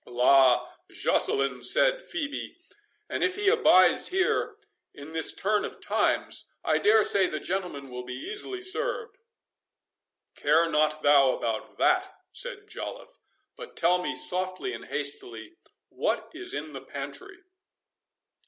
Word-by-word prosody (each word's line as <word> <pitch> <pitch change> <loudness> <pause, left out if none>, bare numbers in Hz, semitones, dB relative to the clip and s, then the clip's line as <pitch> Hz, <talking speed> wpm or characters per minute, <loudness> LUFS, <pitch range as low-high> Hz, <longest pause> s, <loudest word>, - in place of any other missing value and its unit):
"La! 125 +1 +4 0.2
Joceline," 135 -2 +1
said - - +3
Phœbe, 320 -11 -5 0.5
"and - - -3
if 365 0 +1
he 410 -1 +2
abides 450 +1 +5
here 380 +3 0 0.4
in 145 +2 -11
this 160 -1 +2
turn 210 +2 0
of - - -7
times, - - 0
I - - +1
dare 430 +1 +4
say 195 -2 +4
the 155 - -4
gentleman 175 -8 -4
will 125 0 -6
be 125 0 -7
easily 390 - -5
served." 465 +4 -2 1.2
"Care 160 +3 +2
not 155 -1 0
thou 140 -2 +5
about 110 -1 -4
that," - - +1 0.2
said 485 -5 -6
Joliffe; 465 +3 -8 0.4
"but 465 - -11
tell 180 +2 +3
me - - -3
softly 185 - +1
and - - -8
hastily, 120 -6 -5 0.3
what - - -2
is - - -6
in 150 +1 -5
the 135 - -7
pantry?" 140 - -9
165 Hz, 135 wpm, -27 LUFS, -, 1.2 s, abides